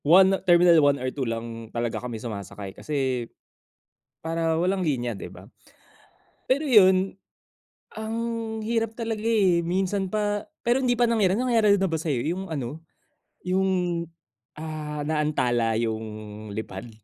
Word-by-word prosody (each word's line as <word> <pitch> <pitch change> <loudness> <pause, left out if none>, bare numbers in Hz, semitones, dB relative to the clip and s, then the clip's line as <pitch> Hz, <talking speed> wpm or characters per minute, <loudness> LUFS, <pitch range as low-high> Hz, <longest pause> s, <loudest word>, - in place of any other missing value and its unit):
1 190 +5 +7
terminal 175 -1 +6
1 145 -1 +4
or 130 +1 -1
2 135 -3 -2
lang 115 -1 -5
talaga 115 -2 -2
kami 120 -2 -4
sumasakay 100 -3 -7
kasi 130 -5 -2 1.0
para 165 0 0
walang 185 +2 +1
linya, 125 -7 -1
'di 100 - -8
ba? - - -13 1.0
Pero 270 +3 +2
yun, 190 -5 +5 0.8
ang 220 +1 -4 0.5
hirap 225 0 -1
talaga 225 -2 -3
eh, 195 -7 +3
minsan 190 +2 -1
pa 205 -1 -1 0.2
pero 240 +2 +3
hindi 245 -1 +3
pa 240 - +5
nangyari. 205 -5 +3
Nangyari 225 -5 +3
na 190 -1 +1
ba 165 - 0
sa'yo 150 -6 -1
yung 175 +5 -2
ano, 145 +1 -4 0.6
yung, 180 -2 0 0.5
ah, 150 -1 -5
naantala 125 -7 +1
yung 110 -2 -5
lipad? 110 0 -6
165 Hz, 135 wpm, -25 LUFS, 120-195 Hz, 1.0 s, 1